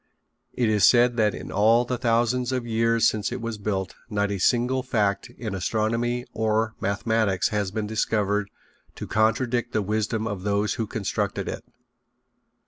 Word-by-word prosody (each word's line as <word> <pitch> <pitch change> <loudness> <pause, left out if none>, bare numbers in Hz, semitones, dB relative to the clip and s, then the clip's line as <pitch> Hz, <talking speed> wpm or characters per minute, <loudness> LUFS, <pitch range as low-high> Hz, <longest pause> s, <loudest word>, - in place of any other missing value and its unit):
It 120 - +1
is 105 -2 +2
said 120 0 +5
that 105 -3 +2
in - - -8
all 115 +4 +4
the 125 - -2
thousands 120 +1 +1
of 125 -2 -2
years 115 0 +2
since 110 +1 -1
it 125 - -4
was 115 -2 -5
built 95 -3 -2 0.2
not 100 -2 0
a 100 - -2
single 125 +5 +2
fact 105 -6 0
in 110 -4 -5
astronomy 115 +5 -1
or 110 0 0
mathematics 100 -1 +1
has 105 -3 -1
been 105 +2 -3
discovered 105 -2 0 0.5
to - - -6
contradict 120 +2 0
the 110 - +1
wisdom 110 +2 -1
of 105 -4 -4
those 100 +1 0
who 110 - -3
constructed 100 -1 -2
it. - - -5
110 Hz, 160 wpm, -25 LUFS, 105-120 Hz, 0.5 s, said